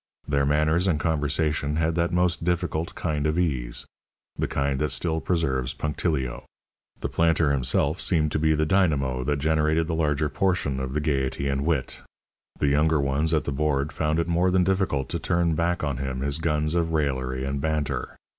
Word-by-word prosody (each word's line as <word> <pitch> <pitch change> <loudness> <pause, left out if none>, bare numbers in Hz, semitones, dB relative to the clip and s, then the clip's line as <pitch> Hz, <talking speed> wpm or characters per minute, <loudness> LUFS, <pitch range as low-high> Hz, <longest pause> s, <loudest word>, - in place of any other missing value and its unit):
Their 70 -1 +1
manners 75 +5 +2
and 80 -5 +1
conversation 75 -1 0
had 80 +1 +1
that 85 +1 0
most 90 -1 +1
difficult 85 -1 -1
kind 75 -3 -1
of 75 +2 0
ease 65 -9 0 0.5
the - - -1
kind 70 -1 -1
that 75 - 0
still 80 +3 -1
preserves 65 -8 0
punctilio. 75 -4 -2 0.6
The - - -1
planter 80 -2 +2
himself 70 +4 0
seemed 75 -4 +1
to - - 0
be 80 0 +3
the 80 +1 +1
dynamo 75 -8 +1
that 75 +3 0
generated 80 +2 +1
the 80 - -3
larger 75 -2 +1
portion 75 -5 0
of 65 +1 -4
the 75 - +1
gaiety 70 -2 -1
and 70 +2 -1
wit. 75 -6 -1 0.6
The 70 - +1
younger 75 +2 +3
ones 70 +3 +1
at 80 -2 +2
the - - -3
board 70 0 0
found 75 0 0
it 85 0 0
more 85 +2 +2
than 90 0 +3
difficult 95 -8 0
to - - -2
turn 85 -1 +1
back 85 +1 0
on 70 -4 -1
him 65 -1 -3
his 70 +3 0
guns 75 -1 0
of 85 -1 0
raillery 65 -4 -1
and 70 0 -2
banter. 75 -1 -2
75 Hz, 185 wpm, -25 LUFS, 70-80 Hz, 0.6 s, be